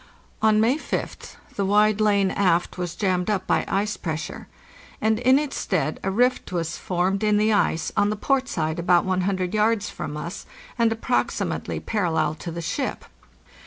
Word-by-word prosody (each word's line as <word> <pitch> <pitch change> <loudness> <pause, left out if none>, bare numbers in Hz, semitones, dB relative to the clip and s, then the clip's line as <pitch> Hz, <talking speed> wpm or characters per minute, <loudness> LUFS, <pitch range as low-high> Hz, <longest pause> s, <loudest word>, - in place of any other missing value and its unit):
On 215 -1 +4
May 240 +7 +3
5th - - -5 0.2
the 200 - 0
wide 210 +2 +3
lane 200 -2 +3
aft 180 -3 +1
was 175 -1 -4
jammed 185 -1 0
up 195 -3 0
by - - +1
ice 210 +2 -1
pressure, 160 -2 -5 0.5
and 220 0 +1
in 255 +2 +5
its 295 -1 -2
stead 160 -5 -1
a 195 - -1
rift 245 +4 +1
was 170 -2 -2
formed 185 +3 -1
in 210 -1 +3
the 215 +1 +3
ice 165 -5 +1
on 205 0 +3
the 215 - -1
port 265 +4 0
side 160 -3 -2
about 175 0 +3
100 185 0 0
yards 215 0 +1
from 150 - -5
us, 170 +4 -6 0.3
and 230 -2 +2
approximately 230 +2 -1
parallel 165 -8 0
to 160 - -7
the 170 +1 -5
ship. 260 - -3
200 Hz, 170 wpm, -24 LUFS, 175-215 Hz, 0.5 s, in